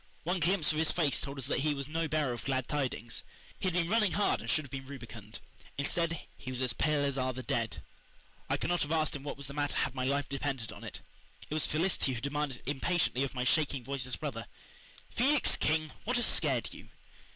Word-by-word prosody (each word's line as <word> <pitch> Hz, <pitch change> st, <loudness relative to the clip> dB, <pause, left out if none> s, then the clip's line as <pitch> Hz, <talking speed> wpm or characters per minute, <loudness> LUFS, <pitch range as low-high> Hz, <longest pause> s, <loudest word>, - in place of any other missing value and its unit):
One 180 Hz, +3 st, 0 dB
glimpse 170 Hz, -1 st, +4 dB
of 155 Hz, -, -1 dB
his 160 Hz, -, +4 dB
face 155 Hz, -5 st, +2 dB
told 140 Hz, -1 st, -4 dB
us 135 Hz, -, -3 dB
that 140 Hz, -, +1 dB
he 150 Hz, +1 st, +2 dB
was 140 Hz, -1 st, -2 dB
no 165 Hz, +2 st, 0 dB
bearer 150 Hz, -4 st, +1 dB
of 120 Hz, -, -6 dB
glad 130 Hz, -2 st, 0 dB
tidings. 130 Hz, -5 st, -1 dB, 0.4 s
He -, -, 0 dB
had 180 Hz, -, 0 dB
been 175 Hz, -2 st, +2 dB
running 210 Hz, -2 st, +3 dB
hard 205 Hz, -, +2 dB
and -, -, -6 dB
should 155 Hz, -, +4 dB
have 130 Hz, -, -13 dB
been 135 Hz, -1 st, -5 dB
rubicund. 115 Hz, -5 st, -9 dB, 0.4 s
Instead, 165 Hz, +4 st, 0 dB
he 130 Hz, -, -8 dB
was 130 Hz, -1 st, -3 dB
"as 125 Hz, -, +1 dB
pale 150 Hz, -2 st, +2 dB
as 140 Hz, -1 st, 0 dB
are 130 Hz, 0 st, +1 dB
the 130 Hz, +1 st, -6 dB
dead." -, -, -1 dB, 0.7 s
I -, -, +2 dB
could -, -, -1 dB
not 175 Hz, -, +2 dB
have 145 Hz, -, 0 dB
asked 155 Hz, -2 st, +2 dB
him 140 Hz, -, -5 dB
what 145 Hz, 0 st, -5 dB
was 140 Hz, -, -6 dB
the 140 Hz, -, -7 dB
matter 145 Hz, 0 st, 0 dB
had 135 Hz, -, +1 dB
my 130 Hz, -1 st, -1 dB
life 140 Hz, +1 st, +1 dB
depended 135 Hz, -4 st, -2 dB
on -, -, -10 dB
it. -, -, -7 dB, 0.5 s
It -, -, -5 dB
was 155 Hz, -, +3 dB
Felicity 155 Hz, -4 st, +1 dB
who 120 Hz, -, -4 dB
demanded 140 Hz, -1 st, -2 dB
impatiently 145 Hz, -1 st, +1 dB
of 140 Hz, -, -3 dB
my 125 Hz, -, 0 dB
shaking, 140 Hz, -1 st, +2 dB
voiceless 130 Hz, 0 st, -3 dB
brother: -, -, -4 dB, 0.6 s
"Felix 275 Hz, +2 st, +3 dB
King, 155 Hz, 0 st, +1 dB
what 250 Hz, +3 st, +1 dB
has 240 Hz, -, +4 dB
scared -, -, +1 dB
you?" -, -, -12 dB
145 Hz, 230 wpm, -32 LUFS, 130-160 Hz, 0.7 s, glimpse